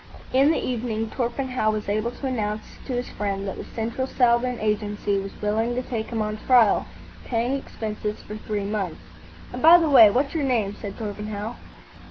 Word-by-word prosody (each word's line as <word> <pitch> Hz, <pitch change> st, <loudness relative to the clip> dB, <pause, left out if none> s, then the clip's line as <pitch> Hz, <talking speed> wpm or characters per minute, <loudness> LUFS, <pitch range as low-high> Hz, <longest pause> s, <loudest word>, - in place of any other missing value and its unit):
In 270 Hz, +3 st, +5 dB
the 320 Hz, -, +3 dB
evening 225 Hz, -3 st, -2 dB
Torpenhow 250 Hz, -2 st, -1 dB
was 215 Hz, -1 st, -2 dB
able 215 Hz, +3 st, 0 dB
to 245 Hz, +3 st, -8 dB
announce 215 Hz, -4 st, -2 dB, 0.2 s
to 260 Hz, -, -3 dB
his 245 Hz, 0 st, -2 dB
friend 200 Hz, -1 st, -3 dB
that 195 Hz, -, -4 dB
the -, -, -6 dB
Central 235 Hz, +3 st, -3 dB
Southern 245 Hz, -1 st, +2 dB
Agency 210 Hz, -1 st, 0 dB
was 195 Hz, 0 st, -7 dB
willing 225 Hz, +3 st, 0 dB
to 255 Hz, -, -1 dB
take 225 Hz, -3 st, -3 dB
him 225 Hz, -2 st, -2 dB
on 215 Hz, 0 st, -3 dB
trial, 240 Hz, -5 st, +5 dB, 0.4 s
paying 240 Hz, +2 st, 0 dB
expenses 215 Hz, -5 st, -4 dB
for 210 Hz, -, -8 dB
three 215 Hz, -1 st, -3 dB
months. 200 Hz, -5 st, -3 dB, 0.5 s
"And, 250 Hz, -, -5 dB
by 330 Hz, +2 st, +9 dB
the 325 Hz, -3 st, +1 dB
way, 230 Hz, -6 st, +9 dB
what's 265 Hz, +7 st, 0 dB
your 320 Hz, -3 st, 0 dB
name?" 230 Hz, -7 st, +1 dB
said 200 Hz, -1 st, -6 dB
Torpenhow. 210 Hz, +1 st, -5 dB
225 Hz, 185 wpm, -24 LUFS, 210-250 Hz, 0.5 s, by